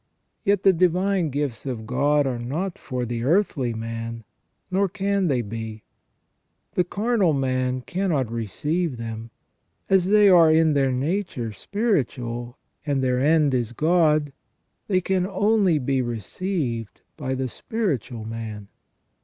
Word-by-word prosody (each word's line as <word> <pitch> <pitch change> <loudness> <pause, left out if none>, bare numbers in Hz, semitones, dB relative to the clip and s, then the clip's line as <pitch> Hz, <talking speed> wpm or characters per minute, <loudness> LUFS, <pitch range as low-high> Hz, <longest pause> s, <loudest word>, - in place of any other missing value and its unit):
Yet 200 -1 +2
the 195 - +6
divine 180 0 +2
gifts 140 -2 -3
of 115 -4 -4
God 145 +5 +2
are 125 -3 -2
not 160 +10 -3
for 125 -1 -3
the 120 0 -3
earthly 145 - +1
man, 115 0 -5 0.5
nor 195 +1 +2
can 200 0 0
they 130 -5 +1
be; 110 0 -6 0.9
the 180 - +2
carnal 200 -1 +1
man 130 -2 0
cannot 160 - -1
receive 145 - -2
them; 115 0 -6 0.6
as 190 -2 +5
they 210 0 +6
are 170 -4 +7
in 160 -1 +4
their 135 -2 +2
nature 135 - -2
spiritual, 120 - -2 0.3
and 140 -3 0
their 125 -1 +1
end 150 0 +3
is 120 -2 -1
God, 155 -1 +2 0.5
they 185 -3 +2
can 185 0 0
only 200 -3 +2
be 135 -1 0
received 120 - -3
by 130 -3 -3
the 130 0 -2
spiritual 130 - -3
man. 110 -3 -6
140 Hz, 135 wpm, -24 LUFS, 120-185 Hz, 0.9 s, are